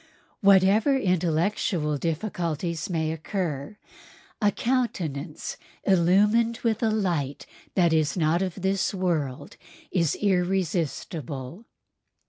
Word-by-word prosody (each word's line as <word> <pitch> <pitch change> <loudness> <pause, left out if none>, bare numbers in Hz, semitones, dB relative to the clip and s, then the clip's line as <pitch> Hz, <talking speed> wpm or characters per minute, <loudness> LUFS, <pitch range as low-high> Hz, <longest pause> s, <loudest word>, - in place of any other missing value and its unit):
Whatever 200 +6 +5
intellectual 170 - 0
difficulties 170 -1 -2
may 160 -3 0
occur, 160 0 -4 0.6
a 205 - +5
countenance 180 - -2 0.3
illumined 205 +6 +3
with 225 -1 +1
a 225 - +2
light 175 -10 -1 0.3
that 175 -3 +4
is 155 +2 +1
not 165 +1 +2
of 190 0 -3
this 195 +1 0
world 155 -7 -2 0.3
is 170 -5 +1
irresistible. 175 - -2
180 Hz, 95 wpm, -26 LUFS, 155-200 Hz, 0.6 s, Whatever